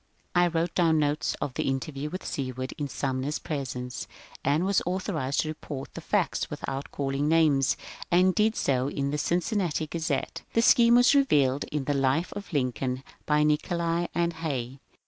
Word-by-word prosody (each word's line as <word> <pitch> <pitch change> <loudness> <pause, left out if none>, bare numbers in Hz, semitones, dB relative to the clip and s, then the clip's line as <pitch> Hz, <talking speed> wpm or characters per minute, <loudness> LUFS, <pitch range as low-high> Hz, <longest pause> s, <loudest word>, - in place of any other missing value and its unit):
^ - - -41 0.3
I 175 0 +4
wrote 165 0 -1
down 165 -3 +3
notes 150 0 0
of 135 - -2
the - - -2
interview 135 +2 -2
with 185 +4 -6
Seward 130 -1 -4
in 145 - -1
Sum 130 -1 -2
ner's 145 +3 -2
presence, 125 -5 -4 0.4
and 150 +6 +2
was 195 0 +2
authorized 175 -7 -1
to - - -4
report 145 -3 -7
the - - -7
facts - - 0
without 135 +1 -5
calling 140 +1 -1
names, 155 -5 +3 0.3
and 185 +2 +4
did 215 +2 +2
so 130 -1 +1
in 140 0 -2
the 150 - -1
Cincinnati 175 -1 0
Gazette." 160 -3 -2
The 230 - +3
scheme 235 0 +6
is 245 +4 +6
revealed 145 - +3
in 150 -2 -3
the 145 - 0
^^ - - -2
Life 140 +6 +1
of 205 -1 -8
Lincoln 130 -2 -1
" - - -35
by 150 0 +3
Nicolay 170 +3 +1
and 170 0 +1
Hay. 135 -5 -4
150 Hz, 185 wpm, -27 LUFS, 135-170 Hz, 0.4 s, scheme